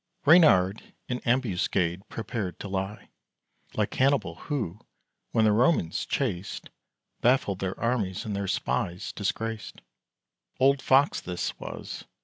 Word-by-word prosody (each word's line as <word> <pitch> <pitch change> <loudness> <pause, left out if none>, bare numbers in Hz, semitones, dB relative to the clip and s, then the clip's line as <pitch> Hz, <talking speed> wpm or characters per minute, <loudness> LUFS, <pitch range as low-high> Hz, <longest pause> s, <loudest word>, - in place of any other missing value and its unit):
Reynard 115 - +5
in 125 0 -2
ambuscade 95 -7 0
prepared 110 -4 -4
to - - -6
lie, 95 +1 -4 0.7
Like - - 0
Hannibal, 130 -10 +2
who, 105 - -4 0.5
when 110 - +3
the 105 - +5
Romans 110 - +2
chased, 100 -9 -3 0.5
Baffled 120 -6 +2
their 95 0 -3
armies, 110 -6 -1
and 105 -2 -3
their 100 0 -2
spies 95 -2 -1
disgraced. 110 +2 -3 0.8
Old 135 +1 +4
Fox 135 +2 +3
this 90 -1 -4
was! - - -7
105 Hz, 120 wpm, -27 LUFS, 95-125 Hz, 0.8 s, Reynard